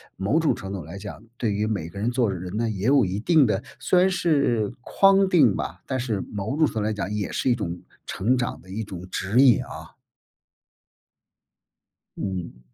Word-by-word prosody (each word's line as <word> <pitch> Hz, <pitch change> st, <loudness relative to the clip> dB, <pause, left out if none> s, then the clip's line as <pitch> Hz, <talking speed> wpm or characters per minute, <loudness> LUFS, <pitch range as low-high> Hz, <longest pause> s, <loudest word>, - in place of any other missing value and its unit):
某 105 Hz, -, +1 dB
种 160 Hz, -2 st, +2 dB
程 95 Hz, -, -7 dB
度 100 Hz, -, -3 dB
上 80 Hz, -, -8 dB
来 90 Hz, +5 st, -8 dB
讲， 105 Hz, +2 st, -9 dB
对 115 Hz, -, 0 dB
于 105 Hz, +1 st, 0 dB
每 100 Hz, -7 st, -2 dB
个 100 Hz, +4 st, -9 dB
人 115 Hz, +4 st, 0 dB
做 120 Hz, -5 st, +1 dB
人 90 Hz, +1 st, -6 dB
呢 115 Hz, 0 st, 0 dB
也 100 Hz, -2 st, -4 dB
有 135 Hz, +1 st, +5 dB
一 95 Hz, +1 st, -2 dB
定 150 Hz, +3 st, +4 dB
的 105 Hz, 0 st, -1 dB, 0.2 s
虽 180 Hz, -, +3 dB
然 185 Hz, -, +4 dB
是 140 Hz, -, +1 dB
框 195 Hz, +5 st, +4 dB
定 145 Hz, -, +4 dB
吧， 90 Hz, +3 st, -5 dB
但 130 Hz, -1 st, -1 dB
是 115 Hz, -5 st, -2 dB
某 110 Hz, +6 st, -4 dB
种 155 Hz, -2 st, +4 dB
程 -, -, -8 dB
度 110 Hz, -, 0 dB
来 110 Hz, +1 st, 0 dB
讲 100 Hz, -1 st, -4 dB
也 105 Hz, -1 st, -2 dB
是 130 Hz, -, 0 dB
一 120 Hz, -, +4 dB
种 90 Hz, -6 st, -4 dB, 0.2 s
成 125 Hz, +7 st, 0 dB
长 120 Hz, -, -3 dB
的 95 Hz, -, -18 dB
一 105 Hz, +4 st, -4 dB
种 95 Hz, -4 st, -8 dB
指 100 Hz, +7 st, +1 dB
引 125 Hz, -7 st, +5 dB
啊。 -, -, -11 dB, 2.2 s
嗯。 90 Hz, -9 st, -5 dB
110 Hz, 220 characters per minute, -24 LUFS, 95-130 Hz, 2.2 s, 有